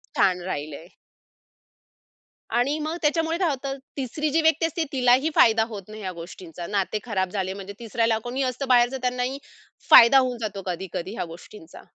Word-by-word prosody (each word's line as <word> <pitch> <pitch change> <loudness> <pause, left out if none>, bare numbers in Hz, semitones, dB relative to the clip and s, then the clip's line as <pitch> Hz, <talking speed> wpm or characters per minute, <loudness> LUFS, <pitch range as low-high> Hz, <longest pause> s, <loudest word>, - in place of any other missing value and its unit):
छान 180 -2 +2
राहिलंय. 155 0 -5 1.6
आणि 245 +6 +1
मग 310 +2 -3
त्याच्यामुळे 325 +2 +1
काय 355 -3 +1
होतं, 275 -1 -4 0.2
3री 280 +3 -2
जी 325 +3 +2
व्यक्ती 320 0 +3
असते 325 0 -1
तिलाही 260 +3 +3
फायदा 225 -1 +5
होत 210 -3 -6
नाही 215 0 -10
ह्या 185 -2 -4
गोष्टींचा. 170 0 -9
नाते 205 +1 -1
खराब 190 -5 -1
झाले 190 -2 -2
म्हणजे 195 0 -8
3ऱ्याला 230 -1 0
कोणीही 255 +3 -2
असतं 255 +2 -3
बाहेरच 245 0 +4
त्यांनाही 250 +1 -1 0.5
फायदा 235 +4 +9
होऊन 255 -2 -1
जातो 200 -3 -4
कधी-कधी 185 +1 -5
ह्या - - -3
गोष्टींचा. 170 -1 -13
235 Hz, 160 wpm, -24 LUFS, 190-275 Hz, 1.6 s, फायदा